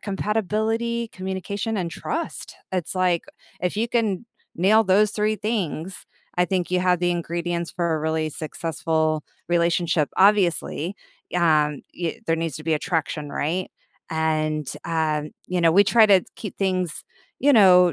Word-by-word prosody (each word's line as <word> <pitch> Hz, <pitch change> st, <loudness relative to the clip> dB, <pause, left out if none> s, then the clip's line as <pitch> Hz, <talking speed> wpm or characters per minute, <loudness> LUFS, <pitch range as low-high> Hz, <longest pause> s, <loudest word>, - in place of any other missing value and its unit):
compatibility, 220 Hz, +3 st, -1 dB
communication 190 Hz, +4 st, -3 dB
and 180 Hz, -4 st, -1 dB
trust. 330 Hz, -, -5 dB, 0.2 s
It's 180 Hz, -2 st, -1 dB
like 180 Hz, -2 st, +2 dB, 0.4 s
if 180 Hz, +2 st, -1 dB
you 225 Hz, +2 st, +1 dB
can 225 Hz, -3 st, 0 dB, 0.3 s
nail 205 Hz, +6 st, +5 dB
those 200 Hz, +2 st, +4 dB
3 215 Hz, 0 st, 0 dB
things, 190 Hz, -5 st, -3 dB, 0.3 s
I 180 Hz, -, +5 dB
think 180 Hz, 0 st, -1 dB
you 180 Hz, -, +3 dB
have 180 Hz, -1 st, +3 dB
the 175 Hz, 0 st, +2 dB
ingredients 170 Hz, 0 st, -2 dB
for 170 Hz, -2 st, -1 dB
a 155 Hz, -, -1 dB
really 160 Hz, 0 st, 0 dB
successful 160 Hz, 0 st, -1 dB, 0.3 s
relationship, 170 Hz, -2 st, +2 dB
obviously, 190 Hz, -2 st, +2 dB, 0.4 s
um, 150 Hz, -4 st, +2 dB
y 170 Hz, -2 st, -3 dB
there 165 Hz, -, +2 dB
needs 165 Hz, -4 st, -2 dB
to 155 Hz, -, -9 dB
be 160 Hz, -1 st, +2 dB
attraction, 150 Hz, -1 st, -2 dB
right, 175 Hz, +7 st, -2 dB, 0.4 s
and, 155 Hz, -2 st, 0 dB, 0.2 s
um, 155 Hz, -2 st, -1 dB, 0.2 s
you 180 Hz, -1 st, 0 dB
know, 165 Hz, -1 st, +5 dB
we 200 Hz, +4 st, +6 dB
try 225 Hz, +2 st, +6 dB
to 195 Hz, -3 st, +5 dB
keep 210 Hz, -, -7 dB
things, 185 Hz, -4 st, -1 dB, 0.4 s
you 285 Hz, +3 st, +5 dB
know, 180 Hz, -6 st, +7 dB
180 Hz, 145 wpm, -23 LUFS, 160-200 Hz, 0.4 s, know